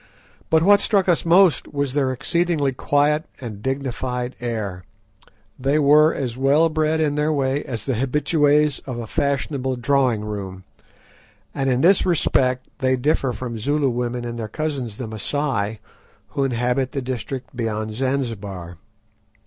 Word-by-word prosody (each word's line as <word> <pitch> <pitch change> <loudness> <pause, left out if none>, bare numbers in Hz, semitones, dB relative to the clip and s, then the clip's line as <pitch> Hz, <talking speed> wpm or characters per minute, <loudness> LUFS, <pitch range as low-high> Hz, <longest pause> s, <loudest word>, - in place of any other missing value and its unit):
But 160 0 +4
what 200 +2 +6
struck 200 -2 +1
us 175 -2 +2
most 180 0 +4
was 140 -2 -1
their 135 -2 +1
exceedingly 160 0 0
quiet 145 +4 +1
and 110 -5 -7
dignified 130 -1 -3
air. 105 -6 -4 0.8
They 135 +3 +1
were 150 +2 +5
as 125 -7 -3
well 140 +5 +3
bred 155 0 0
in 150 -2 +1
their 150 +1 +1
way 140 -1 0
as 115 -3 -5
the 135 - 0
habituées 145 +3 +2
of 125 -3 -4
a 120 - -4
fashionable 140 -1 -1
drawing 125 -3 +1
room, 95 -3 -6 0.9
and 135 -1 -1
in 125 0 +1
this 185 +3 +5
respect 130 -7 +1
they 130 -1 +2
differ 135 0 +1
from 120 -2 -5
Zulu 145 +4 +1
women 120 0 -3
and 120 0 -5
their 110 - -3
cousins 135 -7 -4
the 125 - -5
Masai 110 -1 -2 0.5
who 140 - -1
inhabit 125 +1 0
the 140 - -2
district 130 +1 -5
beyond 110 -2 -2
Zanzibar. 105 -9 -3
130 Hz, 150 wpm, -22 LUFS, 120-150 Hz, 0.9 s, what